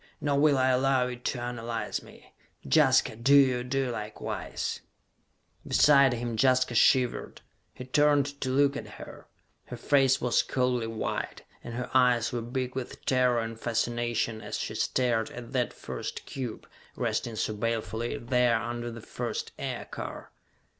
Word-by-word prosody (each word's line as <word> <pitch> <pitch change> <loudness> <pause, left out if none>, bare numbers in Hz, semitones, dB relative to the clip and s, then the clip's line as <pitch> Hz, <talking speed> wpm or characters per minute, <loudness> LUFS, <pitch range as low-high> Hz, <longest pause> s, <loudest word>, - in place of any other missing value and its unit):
"Nor 140 -1 +1
will 145 -1 +4
I 130 0 +3
allow 130 0 +3
it 125 0 -8
to 125 - -1
analyze 115 -2 -3
me! - - -17 0.3
Jaska, 70 - +4
do 130 +5 +4
you 130 -3 +5
do 130 0 -1
likewise!" 105 -2 -4 0.9
Beside 140 -3 +5
him, 120 -1 -3
Jaska 130 +1 +3
shivered. 125 +1 +2 0.3
He 125 - -8
turned 145 +1 +2
to 130 - -1
look 140 +2 +3
at - - -5
her. - - -11 0.4
Her 125 - -8
face 135 +1 +3
was 125 -1 +2
coldly 125 -3 0
white, 115 -1 -4 0.2
and 115 - -7
her 125 0 -4
eyes 125 -3 +3
were 120 - -2
big 125 +2 -3
with 130 -2 -6
terror 125 -2 +3
and 115 0 -6
fascination 120 -1 -1
as - - -4
she - - -4
stared 120 -3 0
at 120 -1 -9
that 125 -2 0
first - - -6
cube, 125 -5 -6 0.3
resting 115 - -2
so 110 - -1
balefully 110 +1 -2
there 120 -1 +2
under 120 +1 -4
the 115 0 -8
first - - -4
aircar. - - -6
125 Hz, 150 wpm, -28 LUFS, 115-130 Hz, 0.9 s, you